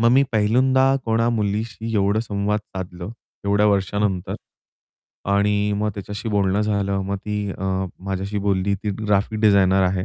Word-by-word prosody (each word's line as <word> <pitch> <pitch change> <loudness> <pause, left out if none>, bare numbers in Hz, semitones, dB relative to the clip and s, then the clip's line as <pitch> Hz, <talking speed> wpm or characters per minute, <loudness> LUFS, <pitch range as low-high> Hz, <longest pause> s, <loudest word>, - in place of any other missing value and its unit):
मग 115 +1 +5
मी 135 +2 +6
पहिल्यांदा 130 +5 +3
कोणा 115 +1 +1
मुलीशी 110 +1 -2
एवढं 100 +1 +2
संवाद 105 -1 -1
साधलं 95 -2 -7 0.4
एवढ्या 105 +1 +3
वर्षांनंतर. 100 -2 0 1.0
आणि 105 +1 +2
मग 105 +1 0
त्याच्याशी 105 +3 -5
बोलणं 100 -1 +1
झालं. 100 -2 0
मग 100 +1 -2
ती 105 0 -3
अ, 95 - -6 0.4
माझ्याशी 100 +1 -3
बोलली. 100 0 +1
ती 105 +2 -3
ग्राफिक 105 +1 +1
डिझायनर 95 -3 +4
आहे. 90 0 0
105 Hz, 145 wpm, -22 LUFS, 100-105 Hz, 1.0 s, मी